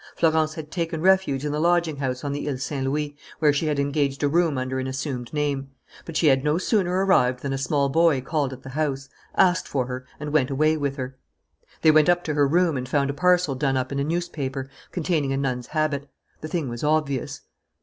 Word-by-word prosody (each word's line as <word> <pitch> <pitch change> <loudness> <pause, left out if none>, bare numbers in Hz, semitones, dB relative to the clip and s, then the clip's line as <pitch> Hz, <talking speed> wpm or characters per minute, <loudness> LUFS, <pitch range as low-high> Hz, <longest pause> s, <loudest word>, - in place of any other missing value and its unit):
Florence 160 -1 +2
had 155 -1 -8
taken 165 -2 -2
refuge 180 -6 +2
in 150 - -1
the 150 - -1
lodging 170 -2 +2
house 130 -2 -3
on 140 -1 -2
the 145 +1 -3
Ile 135 - -2
Saint 135 +1 -3
Louis, 145 +1 -2 0.2
where 150 -2 +3
she 150 +2 0
had 150 -1 0
engaged 140 0 0
a - - +4
room 165 -1 +2
under 130 +1 -2
an 130 - -3
assumed 130 -2 -4
name. 145 -2 -1 0.4
But 165 -2 -4
she 165 - +2
had 135 -2 +4
no 150 +2 +2
sooner 185 -1 +1
arrived 125 -9 +3
than 140 -1 -2
a - - -1
small 140 +1 +1
boy 160 0 +3
called 145 0 -1
at 130 0 -10
the 135 - -8
house, 135 -2 -2 0.3
asked 185 -1 +3
for 130 -3 -1
her, 125 0 -6
and 150 0 -5
went 135 -4 +3
away 155 +3 +2
with 140 -3 -2
her. 130 -1 -6 0.6
They 155 - +7
went 155 +1 +5
up 175 0 +3
to 155 - -2
her 145 -1 +3
room 165 0 +2
and 130 0 -5
found 140 0 +1
a - - -6
parcel 180 -1 +3
done 135 0 0
up 130 +1 -2
in 140 - -2
a - - +1
newspaper, 140 -5 -3 0.2
containing 155 -6 0
a - - -1
nun's 125 -3 -2
habit. 150 -2 -1 0.3
The 155 - -6
thing 160 -3 -2
was 120 +1 -6
obvious. 150 -4 0
145 Hz, 230 wpm, -24 LUFS, 135-160 Hz, 0.6 s, They